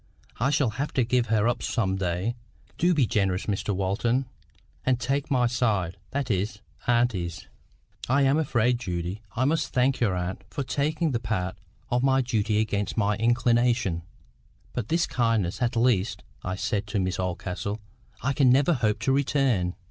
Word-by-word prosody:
I 130 +5 +2
shall 140 -5 +2
have 145 - -2
to 130 - +2
give 120 0 +1
her 110 0 +2
up 120 0 0
some 95 -5 0
day. 95 +4 -1 0.5
Do 175 +1 +3
be 140 -5 +4
generous, 95 -3 0
Mr 100 0 -2
Walton, 100 +7 0 0.6
and 130 -2 +2
take 135 +4 -1
my 125 -4 +3
side—that 110 +1 -1
is, 100 +2 -1 0.3
auntie's." 115 -9 0 0.6
"I 140 +2 +4
am 135 +3 +3
afraid, 120 -5 +2
Judy, 90 -1 -3
I 125 +2 +1
must 150 -1 +1
thank 130 +1 +2
your 105 -6 +2
aunt 90 +1 -3
for 140 - -3
taking 150 +5 0
the 120 - 0
part 95 -5 -2 0.4
of 120 0 +2
my 135 0 +3
duty 110 -4 0
against 105 -1 -1
my 105 -1 +2
inclination. 120 -5 +2 0.7
But 120 -4 -3
this 170 +1 +2
kindness, 115 -5 0
at 120 0 +1
least," 115 -4 +1 0.2
I 90 - -2
said 100 +1 -2
to 105 0 -1
Miss 95 -1 -1
Oldcastle, 95 +3 -3 0.4
"I 140 +2 +1
can 135 -2 +4
never 140 +7 +4
hope 110 -6 +1
to 135 - +1
return." 130 -9 +1
115 Hz, 165 wpm, -26 LUFS, 100-130 Hz, 0.7 s, be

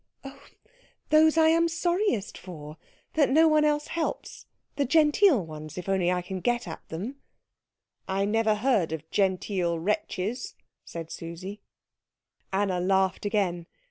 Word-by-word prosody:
"Oh, 275 0 -10 0.7
those 315 +1 +5
I 320 0 +6
am 335 +1 +4
sorriest 345 - 0
for 155 -4 -10 0.4
that 300 -3 +3
no 320 +4 +5
one 305 -1 +4
else 295 0 +1
helps 335 -1 -4 0.3
the 285 - +1
genteel 295 - +4
ones, 155 0 -9
if 180 - -6
I 195 - +1 0.3
can 190 +1 -5
only - - -7
get 240 -1 0
at 160 - -7
them." 210 +12 -5 0.9
"I 195 +1 0
never 220 +1 +2
heard 210 - +1
of 160 0 -6
genteel 185 -3 0
wretches," 205 +4 -2 0.3
said 165 -1 -8
Susie. 180 +5 -7 0.9
Anna 190 -2 0
laughed 190 +2 +1
again. 180 -5 -1
205 Hz, 140 wpm, -27 LUFS, 180-295 Hz, 0.9 s, I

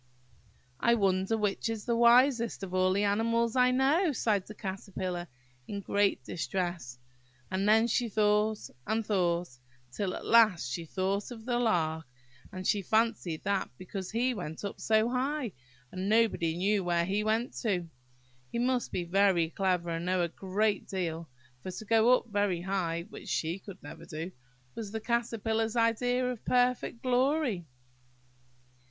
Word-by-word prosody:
"I 235 0 +4
wonder 195 0 +1
which 210 +1 -1
is 225 -2 -4
the 235 - +1
wisest 235 -1 +4
of 185 -1 -6
all 185 0 +3
the 200 +2 +1
animals 230 +3 +1
I 250 0 +5
know," 280 +7 +3
sighed 210 -5 0
the 215 - -9
Caterpillar, 185 -2 -4 0.4
in 200 - -4
great 200 -7 +1
distress; 175 -5 -3 0.5
and 195 +2 +1
then 220 +1 +5
she 235 0 0
thought, 210 0 +1 0.2
and 220 0 0
thought, 175 - 0 0.3
till 185 +6 -2
at - - -7
last 210 - +4
she 165 +6 -4
thought 195 +4 -2
of 225 -3 -9
the 240 -1 0
Lark; 160 - 0 0.4
and 185 0 -7
she 205 - +2
fancied 215 -5 0
that 200 -1 0
because 185 0 -6
he 245 +3 +1
went 175 -3 -6
up 200 - -6
so 220 0 +3
high, 255 0 -1 0.4
and 185 +2 -3
nobody 210 -7 +2
knew 200 +2 +1
where 170 -1 +1
he 200 +3 0
went 220 +3 0
to, 185 -7 -1 0.6
he - - -3
must 245 +1 0
be 180 - -2
very 175 -2 +2
clever, 180 -3 0
and 165 +1 -3
know 185 -1 +2
a 170 - -1
great 200 +5 -1
deal; 170 -4 -3 0.3
for 185 - -6
to 200 +4 -7
go 225 +3 +5
up - - -10
very 205 -4 +1
high 175 -3 -1
(which - - -9
she 165 +4 -1
could 190 -1 -12
never - - -10
do) 165 +3 -6 0.4
was 220 -3 -6
the 220 - -3
Caterpillar's 225 -1 -1
idea 245 +2 +2
of 250 -3 -4
perfect 250 -1 +1
glory. 255 - +1
205 Hz, 160 wpm, -30 LUFS, 185-230 Hz, 0.6 s, I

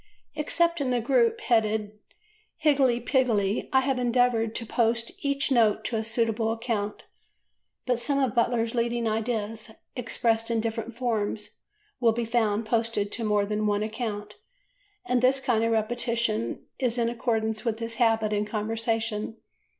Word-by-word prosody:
Except 335 +2 +1
in 270 - 0
the 250 -1 +2
group 235 -1 +2
headed 215 -2 +1 0.6
"Higgledy 275 -6 +3
Piggledy," 230 -6 +1
I 265 -1 +5
have 265 -1 0
endeavoured 240 -2 +2
to 230 - -4
post 230 0 0
each 280 -1 0
note 225 -5 +3
to 235 - -1
a 220 - 0
suitable 225 0 0
account, 225 -3 -3 0.8
but 250 -2 +1
some 275 +4 0
of 265 -5 +1
Butler's 230 -1 +1
leading 235 -1 0
ideas, 220 0 -2 0.3
expressed 230 -2 0
in 230 -1 +1
different 225 0 -3
forms, 220 -4 -2 0.4
will 230 -2 +4
be 235 +1 -2
found 220 -2 +1
posted 225 -2 0
to 230 - -2
more 210 -1 +2
than 210 +1 -1
one 205 0 +1
account, 210 -2 -4 0.7
and 250 -7 +1
this 260 +2 +4
kind 235 -4 +1
of 230 - +1
repetition 225 - 0
is 250 -3 0
in 235 -1 +2
accordance 225 -2 -1
with 230 -3 -1
his 230 0 -5
habit 225 -2 +3
in 205 0 +1
conversation. 225 0 -2
230 Hz, 150 wpm, -27 LUFS, 220-245 Hz, 0.8 s, I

